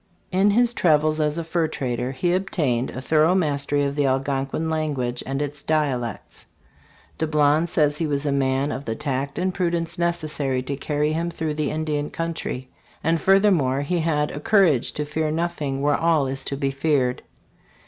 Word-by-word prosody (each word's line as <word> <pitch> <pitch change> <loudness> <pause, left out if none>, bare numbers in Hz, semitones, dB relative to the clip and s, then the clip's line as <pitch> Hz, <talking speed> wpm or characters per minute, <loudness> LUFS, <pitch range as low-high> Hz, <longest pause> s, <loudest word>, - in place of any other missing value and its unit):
In 195 +2 +3
his 240 +3 +3
travels 155 -5 +2
as 150 0 0
a 170 - -2
fur 165 0 0
trader 125 -4 -3
he 175 +7 0
obtained 150 -10 0
a - - -6
thorough 155 +5 +3
mastery 145 -4 +1
of 140 0 -1
the 145 -2 +2
Algonquin 135 +3 -1
language 145 -6 -2
and 135 +2 -1
its 145 0 -5
dialects. 135 -8 -2 0.7
Dablon 155 +1 +2
says 150 -3 +1
he 165 - 0
was 145 0 -1
a 145 - +1
man 135 +1 +1
of 140 - -5
the 115 - -2
tact 140 -1 -3
and 185 +1 0
pru 180 -2 0
dence 170 0 -3
necessary 155 -6 -1
to 140 - -3
carry 150 +2 -1
him 165 +2 -1
through 160 -2 -3
the 150 -1 -1
Indian 150 -1 -2
country; 165 -6 -4 0.4
and 165 +1 +1
furthermore 185 -9 +3
he 170 +5 -1
had 150 -2 0
"a - - -5
courage 165 - +3
to 150 - -3
fear 155 +1 -1
nothing 150 -4 -2
where 145 0 +3
all 165 -4 +2
is 135 0 -3
to 140 - -3
be 135 -1 0
feared." 135 -3 0
150 Hz, 180 wpm, -23 LUFS, 140-165 Hz, 0.7 s, In